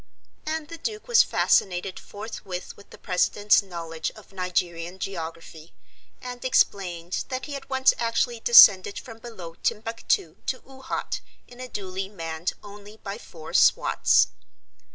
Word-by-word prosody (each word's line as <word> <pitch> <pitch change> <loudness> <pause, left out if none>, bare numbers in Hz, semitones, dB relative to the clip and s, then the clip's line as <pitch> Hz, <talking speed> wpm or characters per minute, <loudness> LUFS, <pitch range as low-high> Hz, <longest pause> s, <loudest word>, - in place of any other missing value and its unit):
And 315 -1 -2
the 330 -1 -8
Duke 430 +1 -5
was 480 -1 +7
fascinated 185 0 +1
forthwith 200 -3 -7
with 200 - -17
the - - -13
president's 205 +3 +3
knowledge 165 -4 -5
of 215 -2 -16
Nigerian 180 -1 -2
geography, 165 -3 -7 0.5
and 245 -1 -8
explained 180 -8 +1
that 260 -1 -3
he 290 - -7
had 275 -1 -7
once 265 0 +4
actually 235 0 0
descended 200 -4 +8
from 230 -4 -9
below 190 -8 -9
Timbuctoo 220 -7 -1
to 255 - -1
Oohat 265 -1 -4 0.3
in 245 - -15
a 255 - -6
doolie 190 -2 -5
manned 165 -3 -4
only 205 +1 -12
by 200 +1 -7
four 160 -7 -11
swats. - - +4
200 Hz, 135 wpm, -25 LUFS, 180-240 Hz, 0.5 s, descended